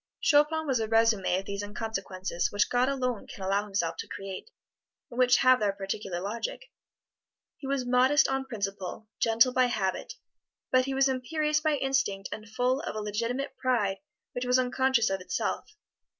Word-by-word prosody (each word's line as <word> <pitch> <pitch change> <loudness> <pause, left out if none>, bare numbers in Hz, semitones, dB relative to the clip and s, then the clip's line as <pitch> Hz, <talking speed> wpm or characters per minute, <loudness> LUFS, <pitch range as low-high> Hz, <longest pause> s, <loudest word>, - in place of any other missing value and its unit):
Chopin 310 +1 +3
was 265 -5 +1
a 220 - -1
resume 225 -4 +3
of 190 - -4
these 200 0 -4
inconsequences 195 -4 -3
which 205 0 +1
God 250 +2 +3
alone 255 -5 -2
can 195 - -9
allow 200 +2 +1
Himself 170 -5 -2
to - - -5
create, 195 - -7 0.6
and 240 - -6
which 250 -1 +5
have 255 0 +5
their 205 -2 +1
particular 195 -2 -4
logic. 225 - -5 0.9
He 275 - -7
was 275 -2 -1
modest 255 +5 +4
on 270 0 -1
principle, 205 -3 -5
gentle 230 +3 +4
by 255 0 +4
habit, 195 -6 -2 0.6
but 255 0 +4
he 270 0 -2
was 270 0 +4
imperious 300 +4 0
by 305 -1 +1
instinct 265 -8 0
and 215 +1 -7
full 250 +4 +1
of 330 - -5
a - - -2
legitimate 230 +6 -3
pride 220 -7 +1 0.3
which 245 - -4
was 250 +1 +4
unconscious 255 -3 +2
of 195 -1 -2
itself. 185 - -3
235 Hz, 170 wpm, -28 LUFS, 200-265 Hz, 0.9 s, which